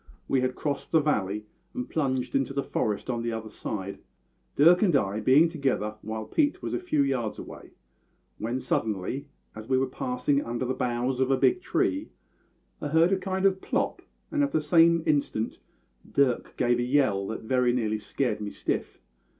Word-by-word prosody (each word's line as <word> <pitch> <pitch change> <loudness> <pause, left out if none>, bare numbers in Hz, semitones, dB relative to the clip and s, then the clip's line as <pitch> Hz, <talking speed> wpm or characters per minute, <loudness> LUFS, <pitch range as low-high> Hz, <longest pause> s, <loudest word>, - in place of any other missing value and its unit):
We 135 - +2
had 130 0 -1
crossed 145 -2 -3
the 160 - +5
valley, 105 -8 0 0.3
and 250 0 -3
plunged 130 -5 -1
into 135 0 +1
the 140 0 -1
forest 105 -2 -2
on 120 -2 -1
the 115 0 -2
other 110 -1 -5
side, 100 -2 -5 0.6
Dirk 170 +5 +6
and 185 -8 +3
I 100 -5 +1
being 135 +9 +5
together 135 -10 -1
while 110 0 -5
Pete 290 - 0
was - - -3
a - - 0
few 360 - +1
yards 125 -6 -1
away, - - -10 0.7
when 120 +4 -2
suddenly, 110 +4 -2 0.3
as 110 +2 -9
we 130 - +3
were 130 - +2
passing 130 +2 -1
under 120 +2 -3
the 130 - -1
boughs 125 0 -1
of 130 0 +2
a 135 - +3
big 365 - +3
tree, 335 -5 0 0.7
I - - -2
heard 160 +4 +4
a 195 - +3
kind 190 0 -1
of 190 -1 +3
plop, - - -1 0.3
and 295 - +1
at 285 - -1
the - - +3
same 165 +2 +4
instant 140 -7 0 0.5
Dirk 135 -3 +1
gave 120 -1 +2
a - - +1
yell 125 -7 +2
that 110 - -5
very 125 +1 +2
nearly 110 -3 0
scared 110 -1 -2
me 105 - -3
stiff. - - -3
130 Hz, 185 wpm, -27 LUFS, 115-155 Hz, 0.7 s, Dirk